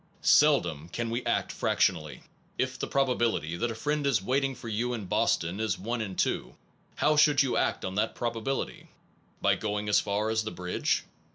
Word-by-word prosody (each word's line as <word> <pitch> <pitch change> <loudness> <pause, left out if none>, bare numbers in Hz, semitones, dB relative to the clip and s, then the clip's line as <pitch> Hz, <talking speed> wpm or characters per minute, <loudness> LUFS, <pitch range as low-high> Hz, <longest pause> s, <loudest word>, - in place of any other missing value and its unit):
Seldom 85 - +4
can 115 +5 -3
we 120 +2 -2
act - - 0
fractionally. 75 -4 0 0.3
If - - -1
the - - -2
probability 120 - 0
that 120 +6 -1
a 115 - -4
friend 145 +4 -1
is 140 - +3
waiting 135 +6 0
for 120 - -10
you 115 +3 -1
in 110 -4 -6
Bos - - +2
tion 85 +5 -5
is 110 -1 0
1 110 -1 -3
2, - - -1 0.4
how 150 - +2
should 150 -2 +5
you 130 - -1
act - - 0
on 95 - -3
that 105 +3 0
probability? 120 +3 -3 0.6
By - - +5
going 105 0 -2
as 105 - +5
far 105 +2 -1
as 110 0 +1
the 110 - -3
bridge? 90 -2 -1
110 Hz, 185 wpm, -28 LUFS, 100-130 Hz, 0.6 s, should